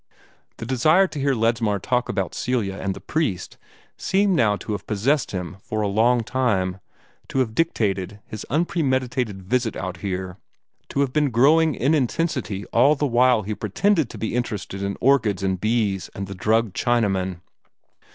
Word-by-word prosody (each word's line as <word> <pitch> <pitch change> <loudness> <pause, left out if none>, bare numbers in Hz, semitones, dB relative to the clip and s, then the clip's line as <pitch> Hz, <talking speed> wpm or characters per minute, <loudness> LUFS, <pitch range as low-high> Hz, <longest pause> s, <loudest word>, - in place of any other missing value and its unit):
The - - -6
desire 155 +10 +4
to 160 -6 -6
hear 140 -1 +1
Ledsmar 115 -2 +1
talk 125 +5 -1
about 95 -3 -2
Celia 115 -6 -1
and 95 -1 -3
the - - -8
priest 150 - -2 0.4
seemed 195 0 +2
now 110 -8 +3
to 100 +3 -7
have 105 - -4
possessed 120 +7 +1
him 90 0 -5
for 110 +2 -3
a - - +1
long 115 +4 +2
time, 95 -7 0 0.5
to - - -5
have 125 -4 +1
dictated 105 - -1
his 110 -1 -7
unpremeditated 130 - -1
visit 120 +3 0
out 90 -1 -5
here, 95 -1 -4 0.5
to 140 - 0
have 135 -2 0
been 150 -2 +2
growing 150 +5 +4
in 140 +6 +1
intensity 130 - -1
all 140 +6 +5
the 145 - -1
while 125 -3 +3
he 105 +3 -3
pretended 155 - +1
to - - -9
be 110 - -3
interested 105 -5 -3
in 100 0 -3
orchids 115 -8 +2
and 95 -1 -1
bees 110 -4 0
and 100 - -4
the 100 - -7
drugged 110 +2 +1
Chinaman. 95 -7 0
115 Hz, 170 wpm, -23 LUFS, 100-130 Hz, 0.5 s, all